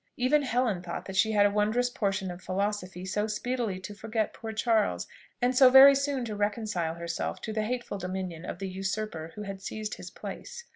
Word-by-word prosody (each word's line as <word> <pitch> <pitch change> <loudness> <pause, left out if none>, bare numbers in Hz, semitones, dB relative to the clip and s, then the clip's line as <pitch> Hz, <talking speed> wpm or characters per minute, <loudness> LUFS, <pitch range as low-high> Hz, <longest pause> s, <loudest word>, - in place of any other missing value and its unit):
Even 260 +4 +3
Helen 245 -8 0
thought 175 -1 -6
that 190 - -7
she 220 +3 +3
had 205 -1 +5
a 205 - +3
wondrous 215 +4 +1
portion 195 -4 -1
of 175 +1 -9
philosophy 185 -1 -2
so 210 +3 -1
speedily 220 -2 -2
to 205 - -7
forget 215 +1 -2
poor 225 -1 -6
Charles, 220 -1 +1 0.4
and 250 +1 +3
so 260 0 +8
very 265 +2 +10
soon 275 -2 0
to 215 -2 -4
reconcile 205 -5 -1
herself 170 0 -3
to 220 - -4
the 215 - 0
hateful 240 -2 -3
dominion 185 -2 -4
of - - -5
the 195 - -4
usurper 190 -3 -4
who 210 - -6
had 195 -1 -6
seized 215 +1 -5
his - - -8
place. 485 -1 -8
210 Hz, 200 wpm, -29 LUFS, 190-240 Hz, 0.4 s, very